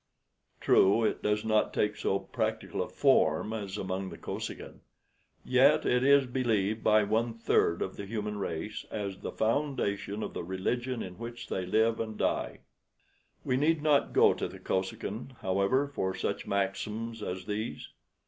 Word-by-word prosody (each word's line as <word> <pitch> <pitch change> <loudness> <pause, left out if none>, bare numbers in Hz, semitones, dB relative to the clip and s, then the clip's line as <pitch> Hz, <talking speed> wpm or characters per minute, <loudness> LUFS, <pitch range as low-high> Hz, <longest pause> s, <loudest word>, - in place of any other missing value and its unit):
True, 100 +4 +4
it 110 - 0
does 105 +1 0
not 110 -1 +2
take 105 0 +1
so 95 - 0
practical 95 - -3
a - - -3
form 110 - +3
as 100 -2 -4
among 95 -1 -3
the 85 - -9
Kosekin, - - -6 0.7
yet - - +4
it 125 +1 +2
is 140 0 +6
believed 115 -4 0
by 110 0 +5
one 115 +3 0
third 100 -6 +2
of 95 - -6
the 100 - -6
human 105 -1 -3
race 100 +4 -4
as 100 -3 -4
the - - -5
foundation 110 -5 -1
of - - -5
the - - -4
religion 120 +7 -2
in 90 +1 -9
which 120 0 -7
they 95 -1 -2
live 110 +4 +2
and 110 -1 -4
die. - - -1 0.8
We 125 - +1
need 150 +2 +2
not 150 -2 +3
go - - +5
to - - -3
the - - -10
Kosekin, 100 +6 -3
however, 100 +9 +2
for 95 -9 -2
such - - -3
maxims 105 +3 -2
as 95 -2 -4
these. 105 +2 -4
105 Hz, 160 wpm, -30 LUFS, 100-115 Hz, 0.8 s, is